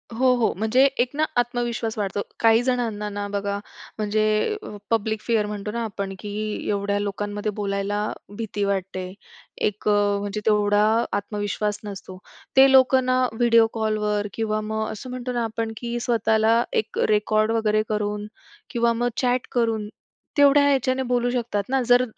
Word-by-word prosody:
हो, 255 Hz, +2 st, +4 dB
हो. 240 Hz, -2 st, +1 dB
म्हणजे 220 Hz, +5 st, +3 dB
एक 245 Hz, +1 st, +2 dB
ना 310 Hz, +1 st, +2 dB
आत्मविश्वास 240 Hz, -2 st, -1 dB
वाढतो. 200 Hz, -1 st, -2 dB, 0.2 s
काही 225 Hz, 0 st, +5 dB
जणांना 230 Hz, -5 st, -1 dB
ना 205 Hz, 0 st, -4 dB
बघा 200 Hz, 0 st, -2 dB, 0.4 s
म्हणजे 215 Hz, -, +1 dB, 0.3 s
पब्लिक 220 Hz, -1 st, 0 dB
फिअर 225 Hz, -3 st, +1 dB
म्हणतो 210 Hz, 0 st, -5 dB
ना 235 Hz, +1 st, -3 dB
आपण, 200 Hz, -3 st, -4 dB
की 210 Hz, 0 st, -4 dB
एवढ्या 200 Hz, 0 st, 0 dB
लोकांमध्ये 205 Hz, +1 st, -3 dB
बोलायला 200 Hz, 0 st, -2 dB, 0.4 s
भीती 215 Hz, -2 st, -3 dB
वाटते. 190 Hz, -2 st, -2 dB, 0.5 s
अ, -, -, +3 dB, 0.2 s
म्हणजे 205 Hz, 0 st, +1 dB
तेवढा 210 Hz, -1 st, +3 dB, 0.3 s
आत्मविश्वास 205 Hz, 0 st, -2 dB
नसतो. 195 Hz, -2 st, -8 dB, 0.4 s
ते 270 Hz, 0 st, +8 dB
लोकं 260 Hz, -1 st, +5 dB
ना 255 Hz, 0 st, +2 dB
व्हिडिओ 230 Hz, -1 st, +4 dB
कॉलवर 210 Hz, -2 st, 0 dB
किंवा 215 Hz, -1 st, -1 dB
मग 220 Hz, 0 st, -2 dB
असं 235 Hz, +4 st, -8 dB
म्हणतो 250 Hz, 0 st, -4 dB
ना, 240 Hz, -1 st, -1 dB
आपण 225 Hz, 0 st, -3 dB
की 240 Hz, 0 st, -3 dB
स्वतःला 225 Hz, -1 st, +2 dB
एक 215 Hz, -, -1 dB
रेकॉर्ड 215 Hz, +1 st, +2 dB
वगैरे 215 Hz, -2 st, +2 dB
करून 210 Hz, -1 st, -2 dB, 0.4 s
किंवा 235 Hz, 0 st, +1 dB
मग 240 Hz, +1 st, 0 dB
चॅट 250 Hz, -1 st, +1 dB
करून 225 Hz, -3 st, 0 dB, 0.5 s
तेवढ्या 285 Hz, 0 st, +6 dB
याच्याने 260 Hz, -1 st, +1 dB
बोलू 245 Hz, -1 st, +1 dB
शकतात 235 Hz, -4 st, -1 dB
ना, 265 Hz, 0 st, +2 dB
जर 245 Hz, 0 st, +6 dB
220 Hz, 150 wpm, -23 LUFS, 205-240 Hz, 0.5 s, ते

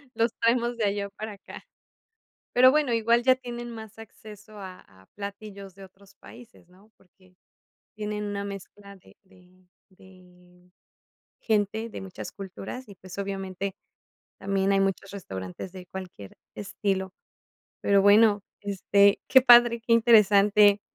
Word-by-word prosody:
Los 230 Hz, 0 st, +1 dB
traemos 235 Hz, +1 st, +1 dB
de 225 Hz, -, 0 dB
allá 200 Hz, 0 st, -2 dB
para 215 Hz, 0 st, -6 dB
acá. 200 Hz, -, -12 dB, 0.9 s
Pero 255 Hz, +1 st, +7 dB
bueno, 295 Hz, -4 st, +1 dB
igual 230 Hz, +1 st, +2 dB
ya 255 Hz, +1 st, +5 dB
tienen 240 Hz, -2 st, -8 dB
más 220 Hz, -1 st, -11 dB
acceso 215 Hz, -2 st, -13 dB
a 185 Hz, -2 st, -10 dB
a 95 Hz, 0 st, -23 dB
platillos 200 Hz, -1 st, -9 dB
de 195 Hz, 0 st, -13 dB
otros 195 Hz, +1 st, -20 dB
países, 235 Hz, -7 st, -16 dB
¿no? 195 Hz, +4 st, -23 dB
Porque 185 Hz, 0 st, -27 dB, 0.6 s
tienen 210 Hz, 0 st, -4 dB
una 200 Hz, -1 st, -4 dB
mezcla 200 Hz, 0 st, -10 dB
de 185 Hz, -, -21 dB
de 185 Hz, -1 st, -24 dB, 0.2 s
de 180 Hz, -1 st, -21 dB, 0.7 s
gente 220 Hz, +1 st, -1 dB
de 220 Hz, -, -8 dB
muchas 190 Hz, -1 st, -8 dB
culturas 195 Hz, +5 st, -9 dB
y, 200 Hz, -, -12 dB
pues, 185 Hz, +1 st, -12 dB
obviamente 195 Hz, -1 st, -4 dB, 0.7 s
también 195 Hz, 0 st, 0 dB
hay 195 Hz, -, +2 dB
muchos 195 Hz, 0 st, -2 dB
restaurantes 95 Hz, -, -8 dB
de 185 Hz, -1 st, -11 dB
cualquier 180 Hz, -, -10 dB, 0.2 s
estilo. 195 Hz, -2 st, -3 dB, 0.7 s
Pero 200 Hz, -1 st, +3 dB
bueno, 205 Hz, +1 st, +5 dB, 0.2 s
este, 200 Hz, 0 st, +2 dB
qué 260 Hz, -, +6 dB
padre, 240 Hz, -2 st, +6 dB
qué -, -, -2 dB
interesante. 210 Hz, -2 st, +5 dB
200 Hz, 140 wpm, -26 LUFS, 190-220 Hz, 0.9 s, Pero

